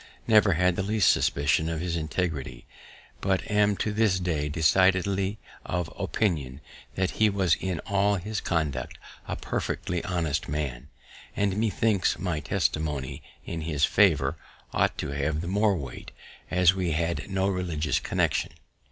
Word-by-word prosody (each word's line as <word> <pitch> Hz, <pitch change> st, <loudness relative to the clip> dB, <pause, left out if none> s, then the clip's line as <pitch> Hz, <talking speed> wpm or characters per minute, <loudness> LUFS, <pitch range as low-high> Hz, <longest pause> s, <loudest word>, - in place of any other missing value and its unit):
never 105 Hz, -4 st, +5 dB
had 90 Hz, +1 st, +2 dB
the -, -, -1 dB
least 105 Hz, -2 st, +3 dB
suspicion 70 Hz, +3 st, +1 dB
of 80 Hz, -1 st, -2 dB
his 85 Hz, 0 st, -2 dB
integrity, 80 Hz, -6 st, -3 dB, 0.6 s
but 95 Hz, -1 st, +1 dB
am 105 Hz, -1 st, +3 dB
to 110 Hz, -, -1 dB
this 105 Hz, -4 st, +2 dB
day 80 Hz, -5 st, -1 dB
decidedly 95 Hz, +5 st, +2 dB, 0.3 s
of 90 Hz, -2 st, -3 dB
opinion 75 Hz, -11 st, -1 dB, 0.4 s
that 95 Hz, 0 st, 0 dB
he 110 Hz, -1 st, +3 dB
was 95 Hz, -4 st, +2 dB
in 95 Hz, -2 st, -2 dB
all 100 Hz, +1 st, +1 dB
his 105 Hz, +3 st, -3 dB
conduct 75 Hz, -7 st, -2 dB, 0.3 s
a -, -, -2 dB
perfectly 90 Hz, -2 st, -3 dB
honest 85 Hz, -6 st, -1 dB
man; 70 Hz, -3 st, -3 dB, 0.5 s
and 100 Hz, -2 st, +1 dB
methinks 105 Hz, -2 st, +1 dB
my 90 Hz, -5 st, -2 dB
testimony 75 Hz, -2 st, -2 dB, 0.2 s
in 80 Hz, -, -4 dB
his 75 Hz, -2 st, +1 dB
favour 80 Hz, -7 st, +3 dB, 0.3 s
ought -, -, +1 dB
to -, -, -3 dB
have 70 Hz, +2 st, -1 dB
the 85 Hz, -, -4 dB
more 100 Hz, +2 st, +2 dB
weight, 65 Hz, -6 st, -7 dB, 0.4 s
as 90 Hz, 0 st, +4 dB
we 90 Hz, -4 st, -1 dB
had 85 Hz, +5 st, -2 dB
no 95 Hz, 0 st, +1 dB
religious 85 Hz, -5 st, -1 dB
connection. -, -, 0 dB
90 Hz, 145 wpm, -27 LUFS, 75-95 Hz, 0.6 s, never